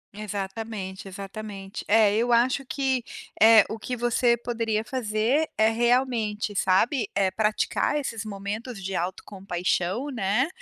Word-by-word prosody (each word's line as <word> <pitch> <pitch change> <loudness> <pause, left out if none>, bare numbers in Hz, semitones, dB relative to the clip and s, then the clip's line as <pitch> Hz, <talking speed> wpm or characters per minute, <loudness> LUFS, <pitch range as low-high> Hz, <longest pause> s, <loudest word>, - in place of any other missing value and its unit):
Exatamente, 200 -1 -5
exatamente. 195 0 -7
É, 210 -1 +5
eu 235 +2 +1
acho 250 +3 +3
que, 265 -2 -1 0.4
eh, 220 -1 +8
o 220 - -6
que 250 +3 -4
você 240 0 +2
poderia 230 -2 -2
fazer, 235 +5 0
é 220 0 +5
realmente, 230 -3 0
sabe, 215 +6 +2
eh, 195 -1 +2
praticar 215 +8 0
esses 225 -6 -4
momentos 210 +2 -6
de 190 +1 -4
autocompaixão, 185 +5 -2
né, 225 +4 +1
220 Hz, 125 wpm, -26 LUFS, 200-240 Hz, 0.4 s, eh